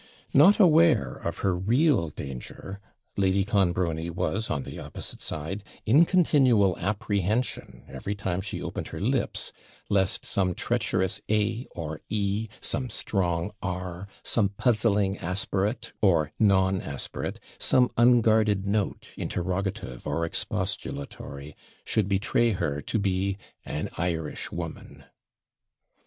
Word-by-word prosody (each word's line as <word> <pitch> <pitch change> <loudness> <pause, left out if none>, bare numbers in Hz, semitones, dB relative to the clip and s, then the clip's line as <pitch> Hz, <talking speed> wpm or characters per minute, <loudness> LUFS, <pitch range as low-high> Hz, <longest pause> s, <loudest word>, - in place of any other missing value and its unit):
Not 180 +11 +7
aware 165 - +5
of - - -4
her 95 -2 +3
real 115 - +2
danger, 75 +8 -7 0.4
Lady 95 0 +2
Clonbrony 90 -5 +1
was, 110 +6 -1
on 70 - -1
the - - -8
opposite - - -6
side, 90 +7 -4 0.2
in 140 +10 +6
continual 130 - +4
apprehension, 100 - -1
every 70 +10 -4
time 95 -3 -2
she 100 - -4
opened - - -4
her - - -7
lips, - - -1 0.4
lest 95 -2 +2
some 90 -3 +1
treacherous 95 0 0
A 110 +3 +1
or 80 -2 -5
E, 105 +1 0
some 130 -2 -1
strong 90 -3 0
R, 90 0 -4 0.2
some 105 -4 +2
puzzling 105 -2 +1
aspirate, 100 +5 -2
or 85 -7 +3
non 95 -3 +3
aspirate, 70 -2 -5 0.2
some 125 -1 +3
unguarded 110 -4 +4
note, 100 0 -1
interrogative 90 -6 -3
or 85 - 0
expostulatory, 70 -2 -4 0.3
should 105 -3 +1
betray 105 +3 +2
her 75 -5 -2
to 90 - -2
be 100 -1 0 0.3
an 75 - -3
Irishwoman. 80 -3 -4
100 Hz, 115 wpm, -27 LUFS, 90-110 Hz, 0.4 s, Not